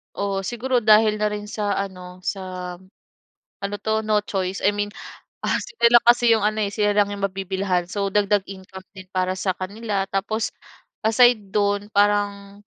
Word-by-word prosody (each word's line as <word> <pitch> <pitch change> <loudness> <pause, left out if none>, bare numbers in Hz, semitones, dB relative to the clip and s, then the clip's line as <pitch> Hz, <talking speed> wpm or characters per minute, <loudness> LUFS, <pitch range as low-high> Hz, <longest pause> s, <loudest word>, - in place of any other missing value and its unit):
Oo, 195 -1 -2
siguro 245 +4 -1
dahil 215 -1 +5
na 210 - 0
rin 210 0 -3
sa 205 -2 -1
ano, 185 -2 -6
sa 185 -2 -5 0.9
ano 200 +1 -3
'to, 220 0 0
no 215 -1 +2
choice. 190 -1 -3
I 200 - +4
mean, 205 0 -2 0.6
ah, - - +2
sila - - 0
lang 240 - +4
kasi 240 0 +5
'yong 225 - +3
ano 215 +1 +1
eh, 200 - -2
sila 205 -1 +1
lang 205 -1 +4
'yong 200 -1 -4
mabibilhan, 190 -1 -2
so 200 +1 -2
dagdag 205 0 +3
income 190 -1 -10
din 190 - -9
para 185 0 0
sa 185 0 0
kanila. 200 +1 -3
Tapos 215 +3 -1 0.6
aside 220 -3 +4
do'n, 205 0 0
parang 205 0 0
205 Hz, 170 wpm, -23 LUFS, 190-215 Hz, 0.9 s, dahil